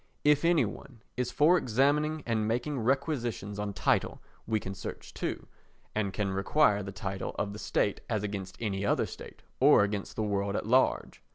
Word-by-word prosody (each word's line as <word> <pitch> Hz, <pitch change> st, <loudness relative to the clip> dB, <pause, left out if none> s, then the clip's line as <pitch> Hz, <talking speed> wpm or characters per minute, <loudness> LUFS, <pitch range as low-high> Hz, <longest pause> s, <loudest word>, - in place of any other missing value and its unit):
If 150 Hz, 0 st, +4 dB
any 165 Hz, -6 st, +4 dB
one 115 Hz, +2 st, -9 dB
is 125 Hz, 0 st, -1 dB
for 165 Hz, +5 st, +5 dB
examining 145 Hz, +5 st, +1 dB
and 110 Hz, -2 st, 0 dB
making 125 Hz, +5 st, -1 dB
requisitions 120 Hz, -5 st, -1 dB
on 105 Hz, 0 st, -2 dB
title 95 Hz, -, +1 dB, 0.3 s
we 110 Hz, -1 st, +1 dB
can 95 Hz, -1 st, -6 dB
search 95 Hz, -, -8 dB
too, -, -, -4 dB, 0.5 s
and 105 Hz, -2 st, -1 dB
can 100 Hz, 0 st, -2 dB
require 100 Hz, +2 st, +3 dB
the 100 Hz, 0 st, -6 dB
title 95 Hz, 0 st, -4 dB
of 100 Hz, 0 st, -2 dB
the 105 Hz, -, -8 dB
state 100 Hz, -, 0 dB
as 110 Hz, -3 st, -1 dB
against 100 Hz, -3 st, -5 dB
any 100 Hz, -3 st, -2 dB
other 100 Hz, -, +2 dB
state, -, -, -11 dB, 0.2 s
or -, -, +7 dB
against 100 Hz, -1 st, -3 dB
the 110 Hz, -, -1 dB
world 100 Hz, -1 st, -1 dB
at -, -, -2 dB
large. 130 Hz, +4 st, +2 dB
110 Hz, 180 wpm, -30 LUFS, 100-135 Hz, 0.5 s, or